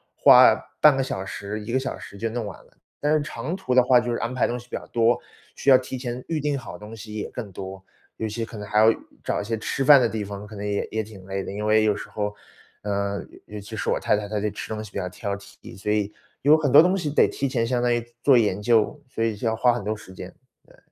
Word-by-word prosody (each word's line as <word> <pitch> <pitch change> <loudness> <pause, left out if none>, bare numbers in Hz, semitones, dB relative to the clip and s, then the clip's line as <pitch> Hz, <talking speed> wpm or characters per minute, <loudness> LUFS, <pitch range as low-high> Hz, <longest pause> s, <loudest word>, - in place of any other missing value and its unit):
花 - - +8 0.3
半 150 -3 +7
个 - - +2
小 95 -7 -4
时， 100 +2 -5
1 110 +3 -6
个 130 - +2
小 135 - -4
时 100 - -11
就 115 +2 -2
弄 115 -1 -3
完 100 - -7
了。 - - -25 0.3
但 150 +1 +1
是 155 - +3
长 155 +3 -4
途 160 -10 -2
的 125 - +7
话， 125 -1 +5
就 120 0 -2
是 120 - -1
安 115 +2 -3
排 130 - +2
东 120 +1 -3
西 120 - -15
比 - - -5
较 - - -6
多。 115 +1 +2 0.4
需 140 - 0
要 130 - +9
提 130 0 -6
前 125 0 -5
预 160 -2 -1
定 145 0 0
好 130 - -8
东 105 +2 -11
西 110 -1 -10
也 105 - -4
更 110 -5 -7
多。 95 +1 -8 0.3
尤 110 - -2
其 115 +2 -4
可 115 -1 -8
能 105 0 -7
还 105 0 +2
要 110 +1 +7 0.3
找 - - -1
一 - - -3
些 115 +2 -2
吃 135 +4 -2
饭 140 -3 +9
的 120 - +2
地 110 -2 -3
方， 100 +1 -7
可 110 - -11
能 100 +1 -5
也 100 0 -1
也 110 0 -2
挺 100 -3 -13
累 95 0 -3
的。 - - -6
因 105 +1 -4
为 110 0 +4
有 105 -1 +2
时 - - -8
候， 105 -1 -3 0.5
呃， 100 -1 -2 0.2
尤 105 0 -8
其 100 - -9
是 - - -1
我 - - +1
太 - - +2
太， 105 -1 -4
她 105 0 -2
对 105 +1 -1
吃 105 - -7
东 110 0 -4
西 105 - -10
比 - - -6
较 90 -2 -2
挑 100 +2 -4
剔。 100 - -14
所 105 +2 -2
以， 105 -1 0 0.3
有 150 +3 +6
很 145 -4 0
多 - - +10
东 185 +3 +2
西 155 -6 -2
得 - - +4
提 140 - -2
前 115 -3 0
相 125 -1 0
当 120 -1 +2
于 120 - 0 0.2
做 135 -3 +6
研 105 -4 +2
究， 115 +5 +2
所 115 -3 -3
以 110 -2 0
就 115 - -3
要 110 - +1
花 120 +2 +4
很 120 -4 -3
多 110 +2 -2
时 100 -3 -13
间， - - -9 0.4
对。 - - -20
110 Hz, 305 characters per minute, -24 LUFS, 105-125 Hz, 0.5 s, 多